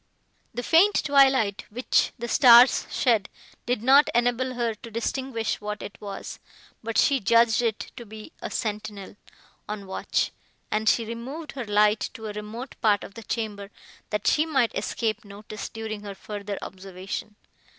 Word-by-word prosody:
The 245 +2 -5
faint 365 +9 +4
twilight, 265 -8 +3
which 245 +4 +1
the 235 - -5
stars 240 +1 +7
shed, 225 -6 +1 0.4
did 245 -2 0
not 275 +4 +6
enable 245 +2 +1
her 235 -2 0
to 230 +2 -12
distinguish 230 0 -2
what 210 0 -5
it 200 - -10
was; 200 -2 -7 0.4
but 230 0 -3
she 280 -3 +4
judged 230 +2 +4
it 225 -3 -2
to 240 - -7
be 215 +6 -10
a - - -4
sentinel, 210 -3 -4 0.5
on 210 -1 -5
watch, 190 - -1 0.4
and 215 0 +2
she 230 - +2
removed 255 +8 -6
her 260 -3 -6
light 210 +1 +2
to 225 -3 -8
a 210 - -4
remote 215 +5 -7
part 210 -2 +3
of - - -10
the 230 - -9
chamber, 210 -3 -4 0.4
that 210 -1 -2
she 305 - +4
might 270 -7 +1
escape 230 0 -2
notice, 210 +1 -8
during 220 -1 -6
her 200 -1 -7
further 205 0 -6
observation. 190 +2 -7
225 Hz, 160 wpm, -25 LUFS, 210-245 Hz, 0.5 s, stars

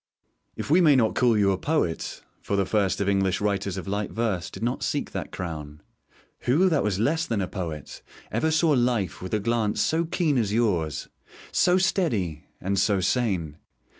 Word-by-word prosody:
If - - -5
we 175 +4 +6
may 150 -5 +6
not 115 -4 +3
call 120 -3 +3
you 100 -1 +3
a 95 - -1
poet 145 - -1 0.2
(for 100 - -2
the 100 -1 +2
first 100 -1 +1
of 100 - 0
English 95 -2 +1
writers 100 -2 -1
of 95 - -6
light 100 +1 -2
verse 110 -6 -2
did - - -8
not 120 +1 -1
seek - - -2
that - - -5
crown), 75 -4 -6 0.7
who 175 +9 +4
that 155 -5 +2
was 105 -3 0
less 160 - +1
than 115 - -1
a 95 - -1
poet 80 -7 -6 0.3
ever 120 +9 +1
saw 160 0 +3
life 120 - +1
with 95 +3 -2
a - - +1
glance 110 0 0
so 165 +1 +1
keen 160 -5 +1
as 105 -3 0
yours, 95 -10 0 0.4
so 180 +1 +3
steady, 115 - 0
and 95 +1 -1
so 100 -1 +2
sane? 90 - 0
105 Hz, 190 wpm, -25 LUFS, 95-125 Hz, 0.7 s, we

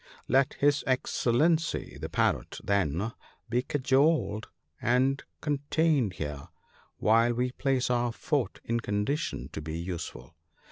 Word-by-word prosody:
" - - -20
» - - -44
Let 135 -1 +2
his 145 +1 +2
Excellency 150 +5 +1
the - - -4
Parrot, - - 0
then, 100 +1 0 0.4
be 120 +1 +2
cajoled 135 -4 +2 0.3
and 130 +3 +2 0.2
de 145 -2 0
tained 150 - +2
here, 75 -2 -5 0.5
w - - -35
T - - -5
hile 115 +2 +5
we 125 0 +1
place 130 -1 0
our 120 -1 +1
fort 130 -2 -1
in 115 0 0
condition 105 - -2
to 80 - -6
be 80 +1 -4
useful. 85 0 -6
125 Hz, 145 wpm, -29 LUFS, 100-140 Hz, 0.5 s, hile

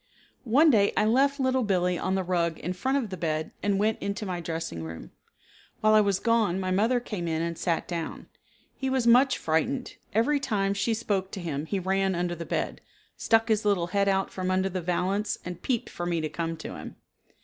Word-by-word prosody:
One 295 +7 +6
day 205 -4 +3
I - - +4
left 275 +5 +3
Little 260 -1 +2
Billee 180 -5 +1
on 190 - 0
the 190 - 0
rug 170 -2 0
in 180 - -3
front 260 +9 0
of 230 -8 -3
the 185 - -4
bed 155 -2 -2
and 200 -1 +1
went 215 +2 +1
into 200 +1 -3
my 180 -2 -3
dressing 165 - -4
room. 80 0 -8 0.7
While 215 0 +4
I 215 - +7
was 200 -2 +2
gone 220 -4 +2
my 185 -1 -2
mother 225 +6 +2
came 210 -7 -5
in 160 0 -1
and 170 0 -2
sat 165 0 -1
down. 170 -2 -4 0.5
He 265 - -2
was 260 -2 +1
much 250 +3 +5
frightened. 245 - -1
Every 245 +7 +2
time 200 -7 0
she 220 +3 0
spoke 200 -4 -1
to - - -4
him 155 -3 -4
he 200 - -1
ran 190 0 +1
under 175 0 -1
the 170 -1 -7
bed, - - -2 0.3
stuck 225 0 +2
his 220 -2 +2
little 200 -5 +1
head 200 0 +2
out 195 0 +1
from 185 -1 -3
under 190 +1 +1
the 185 -1 -3
valance 190 +4 -1
and 180 -1 -6
peeped 245 -4 -1
for 175 - -4
me 170 -1 0
to 155 -1 -2
come 165 0 -3
to - - -7
him. - - -9
195 Hz, 215 wpm, -27 LUFS, 175-225 Hz, 0.7 s, I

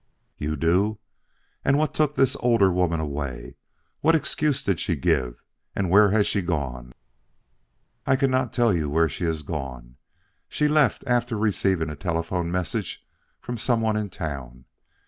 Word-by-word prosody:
"You 75 +1 -2
do. 95 +8 +2 0.7
And 135 +1 +3
what 155 0 0
took 150 -1 +1
the 135 0 +3
older 115 -6 +3
woman 90 -2 +1
away? 70 -5 -5 0.4
What 165 +2 +4
excuse 150 -1 0
did 95 -5 0
she - - -1
give, - - -1 0.3
and 95 -3 -1
where 105 +1 +7
has 105 +1 +3
she 100 - 0
gone?" 65 -8 -3 1.1
"I - - +4
cannot 130 -2 +1
tell 120 -4 +2
you 80 -4 -1
where 80 +3 +3
she 80 +4 -4
has 80 -2 -2
gone. 65 -5 -6 0.5
She 150 - +1
left 150 -5 +2
after 120 -2 0
receiving 95 -6 +1
a - - -6
telephone 85 +1 -2
message 90 -1 -3 0.3
from 120 -1 -6
some 120 0 +1
one 110 -1 +1
in 105 -1 -2
town. 65 -8 -6
90 Hz, 155 wpm, -24 LUFS, 75-120 Hz, 1.1 s, where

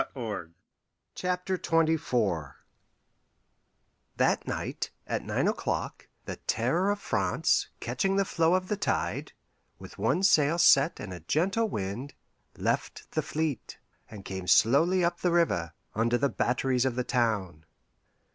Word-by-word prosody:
THE 110 -9 -4 0.7
SACRED 180 0 -2
COUNTERSIGN 150 - +1 1.7
That - - +1
night, - - -3 0.2
at - - -2
nine - - 0
o'clock, - - -2 0.2
the - - -5
Terror 150 - 0
of 205 0 0
France, - - +1
catching 195 -2 -1
the 195 0 +2
flow 165 -1 +2
of 185 0 -1
the 210 - -1
tide, 200 - -2 0.4
with - - -12
one 130 - +1
sail 155 -4 +4
set 140 -5 +5
and 95 -2 -6
a 90 - -7
gentle 190 - 0
wind, 105 - -4 0.4
left - - -2
the - - 0
fleet, 155 -4 -3 0.3
and 100 -3 -10
came 95 -1 -6
slowly 165 - +4
up 170 0 -1
the 180 - +1
river, 160 - +1 0.2
under 115 +2 +1
the 140 +2 +1
batteries 125 0 0
of 130 -3 0
the 125 - 0
town. 105 - -1
140 Hz, 135 wpm, -28 LUFS, 110-175 Hz, 1.7 s, set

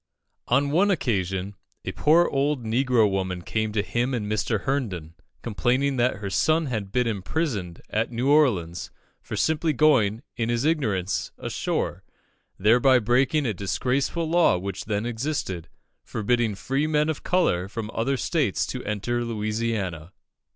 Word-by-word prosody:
On 140 +3 +2
one 190 +7 +3
occasion, 100 - -1 0.3
a - - -2
poor 165 +3 +4
old 140 -1 0
negro 120 -1 +3
woman 95 -2 -2
came 110 +2 -1
to 105 -2 +1
him 120 +7 -1
and 110 -4 -2
Mr. 105 +1 -1
Herndon, 100 - -2 0.3
complaining 130 +5 0
that 125 0 +2
her 100 -1 -5
son 155 - +2
had 110 -7 -3
been 125 +2 +1
imprisoned 105 - -2
at 110 +3 -1
New 120 +3 -1
Orleans 115 - +2 0.3
for - - -6
simply 160 0 +1
going, 125 -7 +3
in 115 -2 -1
his 120 +3 0
ignorance, 100 - 0
ashore, - - -2 0.5
thereby 120 +6 +5
breaking 130 +6 +2
a 115 - 0
disgraceful 130 - -1
law 170 - +4
which 95 +1 -5
then 105 0 -1
existed, 115 - -3 0.3
forbidding 115 0 0
free 135 +8 -1
men 150 -1 +2
of 160 -2 -2
colour 95 - +1
from 110 +1 -5
other 135 +4 0
states 140 - 0
to 125 - -5
enter 120 +4 -2
Louisiana. 105 -6 -3
115 Hz, 145 wpm, -25 LUFS, 100-140 Hz, 0.5 s, thereby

